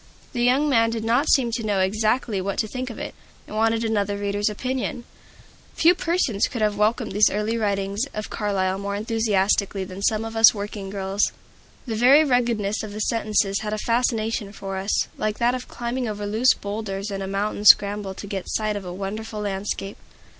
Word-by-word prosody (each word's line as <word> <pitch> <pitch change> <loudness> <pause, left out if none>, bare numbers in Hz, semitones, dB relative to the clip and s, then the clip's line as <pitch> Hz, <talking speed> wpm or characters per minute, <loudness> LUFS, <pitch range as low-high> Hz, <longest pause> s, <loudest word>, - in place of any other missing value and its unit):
The 240 - -2
young 260 +5 +3
man 230 -5 +3
did 225 -1 -3
not 240 +6 +2
seem 245 -4 +3
to 230 0 -2
know 205 -2 0
exactly 215 +2 +1
what 195 +1 -3
to 215 - 0
think 255 +3 -5
of 230 - -8
it, - - -6 0.3
and - - -9
wanted 225 +1 +1
another 205 -2 0
reader's 205 +1 0
opinion. 250 +2 -3 0.7
Few 335 +2 +5
persons 335 - 0
could 235 -3 -3
have 210 -1 +1
welcomed 215 +3 +1
those 205 +2 +4
early 210 +3 -1
writings 200 0 -1
of 215 0 -6
Carlyle 195 -2 -1
more 200 0 -3
enthusiastically 205 -2 0
than 185 +1 -8
some 215 +2 +1
of 225 0 -6
us 225 0 +7
working 205 -1 -5
girls 195 0 -3
did. - - +2 0.6
The 220 - -3
very 275 +5 +7
ruggedness 235 -6 +1
of 215 -2 -7
the 210 - -6
sentences 210 -3 +1
had 215 0 -4
a - - -1
fascination 230 -3 0
for 195 -1 -5
us, 195 +2 0
like 215 0 -1
that 240 +1 +2
of 255 -1 -5
climbing 240 +1 -3
over 210 -1 -4
loose 220 +5 +3
bowlders 200 -1 -4
in 195 0 -4
a 190 - -3
mountain 205 +1 -2
scramble 205 -1 +5
to 200 - -8
get 195 -2 -5
sight 215 -1 -1
of 200 - -4
a 180 - -5
wonderful 210 +3 -5
landscape. 195 0 -4
210 Hz, 195 wpm, -23 LUFS, 200-230 Hz, 0.7 s, us